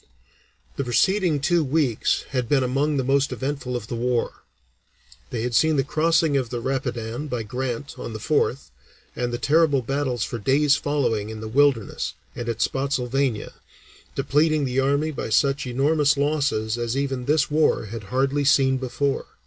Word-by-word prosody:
The 140 - 0
preceding 175 - +2
two 170 +3 +2
weeks 140 -5 +1
had 125 -3 -2
been 135 -3 +3
among 140 +4 0
the 135 - +1
most 140 +2 +1
eventful 135 -2 -3
of 120 - -4
the 120 - -7
war. 120 0 -1 0.9
They 115 -2 -3
had 120 0 -2
seen 155 +6 +3
the 135 - +2
crossing 160 +1 +2
of 130 -4 0
the 120 0 -3
Rapidan 125 0 -3
by 125 -5 -3
Grant 125 +4 -4
on - - -6
the - - -4
4th, 140 +1 0 0.4
and 120 -1 -2
the 120 - -2
terrible 145 +1 +3
battles 130 -2 -1
for 120 - -4
days 140 +5 +3
following 125 -8 -1
in 110 -1 -7
the 110 - -6
Wilderness 130 -2 +1 0.2
and 120 0 -4
at 115 0 0
Spottsylvania, 135 -3 -1 0.6
depleting 150 0 +2
the 130 0 0
army 140 +3 +1
by 135 - -5
such 135 +4 +2
enormous 145 +3 +2
losses 140 -6 0
as 120 +2 -2
even 135 -3 -2
this 150 +1 +2
war 155 -6 +2
had 105 0 -7
hardly 135 +5 0
seen 135 -1 +4
before. 130 +2 -2
135 Hz, 165 wpm, -23 LUFS, 120-145 Hz, 0.9 s, seen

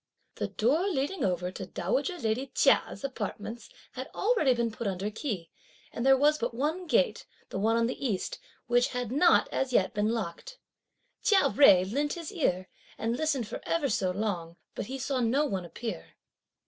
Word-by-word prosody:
The - - -1
door 295 - +1
leading 305 -1 -1
over 180 -1 0
to - - -6
dowager 405 -7 -1
lady 240 0 -1
Chia's - - +3
apartments 230 - -5 0.2
had - - -7
already 395 - +3
been 235 -1 0
put 220 0 -4
under 195 +2 -2
key, 205 - -4 0.4
and 235 - -4
there 270 0 +6
was 300 +3 +3
but 235 0 -2
one 315 +8 -2
gate, - - +1 0.2
the - - -4
one 220 +3 +2
on 230 0 +2
the 250 +3 -4
East, 215 -8 -2 0.3
which 245 0 +3
had 245 -3 -4
not 320 +6 +4
as 265 -1 -1
yet 190 -5 +3
been 210 0 +1
locked. 230 - -4 0.6
Chia 385 -9 +4
Jui 195 -8 +6
lent 290 +2 0
his 335 -3 -6
ear, 185 - 0 0.3
and 230 +1 -1
listened 280 -5 0
for - - -6
ever 315 -4 0
so 190 -3 +1
long, 180 -4 -3 0.2
but - - -5
he 265 - -4
saw 265 0 -1
no 250 +5 +2
one 190 -10 -3
appear. 225 +6 -7
240 Hz, 180 wpm, -29 LUFS, 210-290 Hz, 0.6 s, there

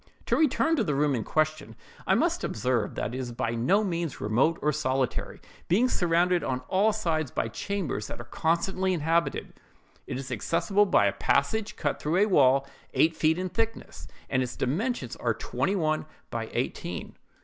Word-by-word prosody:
"To - - +2
return 320 +2 +3
to 230 - +2
the 150 -8 -1
room 145 0 +2
in 115 -4 -1
question, 155 -6 -1 0.3
I - - +4
must - - +1
observe 115 -1 -1
that 115 - -3
it 130 - -3
is 125 -2 -4
by 120 0 -2
no 130 - +2
means 170 -6 -2
remote 120 +10 +2
or 150 - +1
solitary, 135 -3 -1 0.3
being 220 +9 +3
surrounded 175 -3 +2
on 130 -1 -2
all 200 +4 +3
sides 165 - -1
by 115 - -2
chambers 180 - -3
that - - -7
are - - -6
constantly 185 - 0
inhabited. 165 +1 0 0.5
It - - -3
is 130 -1 -6
accessible 170 - +1
by 100 - +4
a 100 - +2
passage 210 +10 0
cut 145 -3 -2
through 155 +4 0
a 200 - +5
wall 135 -8 +4 0.3
eight 160 +1 +4
feet 160 +1 +2
in 185 0 -2
thickness, 225 +5 -3 0.2
and 130 - +1
its 125 -1 -3
dimensions 215 - -2
are - - 0
twenty 195 +1 -1
one 155 -4 0 0.2
by - - -3
eighteen. - - -3
155 Hz, 180 wpm, -27 LUFS, 130-190 Hz, 0.5 s, a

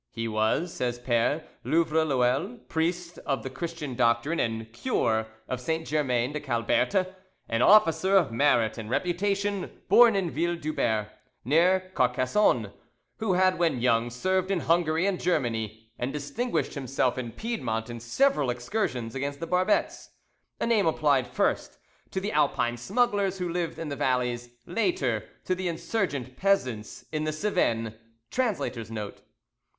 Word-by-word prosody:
"He 115 0 -4
was," 110 +11 0
says 120 -1 -2
Pere 120 +5 +1 0.2
Louvreloeil, 160 - +1
priest 170 +2 -2
of 135 -2 -2
the 130 - -5
Christian 155 0 -5
doctrine 120 +6 +1
and 115 -1 -2
cure 110 - 0 0.2
of 125 -1 -3
Saint 160 +5 -2
Germain 130 -3 0
de 150 - -2
Calberte, 130 - +1 0.4
"an 115 +1 0
officer 190 +1 +5
of 170 -10 +2
merit 115 -3 +2
and 110 -1 -7
reputation, 195 - -1 0.2
born 235 -3 +7
in 185 -4 0
Ville 170 +2 0
Dubert, 115 -9 -1 0.4
near 185 +6 +3
Carcassonne, 130 +10 +2 0.5
who 220 -4 0
had 185 0 +3
when 165 -7 +2
young 120 -1 +2
served 185 +10 0
in 190 -4 0
Hungary 165 0 +2
and 195 -2 0
Germany, 115 - -1
and 125 +2 -2
distinguished 180 - -2
himself 130 -2 -1
in 120 -2 -5
Piedmont 120 - -3
in 120 - -6
several 145 - +2
excursions 120 - -2
against 140 +1 -3
the 165 - -3
Barbets, 185 +4 0 0.3
[ - - -49
A - - 0
name 225 -6 +3
applied 145 -5 +2
first - - -1 0.3
to 190 - -2
the 200 +2 -3
Alpine 130 -5 +1
smugglers 200 - +1
who 180 -1 -2
lived 170 -1 -2
in 165 - -5
the 140 - -3
valleys, 125 -2 0 0.2
later 135 - 0 0.2
to 185 - +1
the 185 0 -3
insurgent 160 - -2
peasants 130 - 0
in 155 -1 -1
the 155 - 0
Cevennes.—Translator's 115 - -2
Note. 105 -3 -6
150 Hz, 145 wpm, -27 LUFS, 120-185 Hz, 0.5 s, born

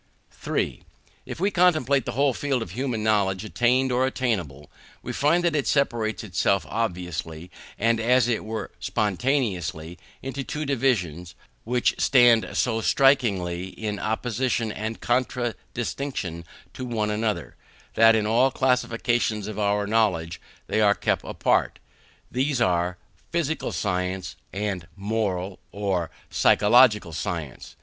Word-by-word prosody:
3. - - -3 0.5
If - - -6
we 195 +3 +1
contemplate 155 - +3
the - - -2
whole 140 +1 +2
field 135 -2 -1
of - - -10
human 125 -4 -2
knowledge, 100 -3 +1
attained 125 +4 +2
or 125 +1 +2
attainable, 90 - -3 0.3
we - - -5
find 165 +5 +2
that 170 -2 +1
it 145 - 0
separates 120 -7 0
itself 100 0 +1
obviously, 90 -5 -4 0.3
and 115 +1 +2
as 120 +1 +3
it 120 -2 0
were 110 0 -5
spontaneously, 95 - -1 0.2
into 135 +1 -4
two 150 +3 -4
divisions, 95 - -1 0.3
which 125 +1 +1
stand 120 -4 +5
so 115 -3 0
strikingly 100 -11 +2
in 105 +1 -5
opposition 115 +1 -1
and 110 +1 -5
contradistinction 120 - -2 0.3
to 130 - -7
one 110 -4 -1
another, 105 0 -2 0.4
that 115 0 +6
in 110 -1 +1
all 120 +5 +3
classifications 120 -4 0
of 110 -1 -5
our 105 0 +1
knowledge 95 -6 0 0.2
they - - -1
have 105 -1 +3
been - - -19
kept - - +1
apart. - - +1 0.5
These 130 +1 0
are, 90 -4 +1 0.3
physical 160 -2 -1
science, 90 -1 -2 0.2
and 95 -4 -3
moral 100 -3 -2
or 95 -5 -1 0.2
psychological 105 -5 +4
science. 80 -3 -5
110 Hz, 130 wpm, -25 LUFS, 95-125 Hz, 0.5 s, that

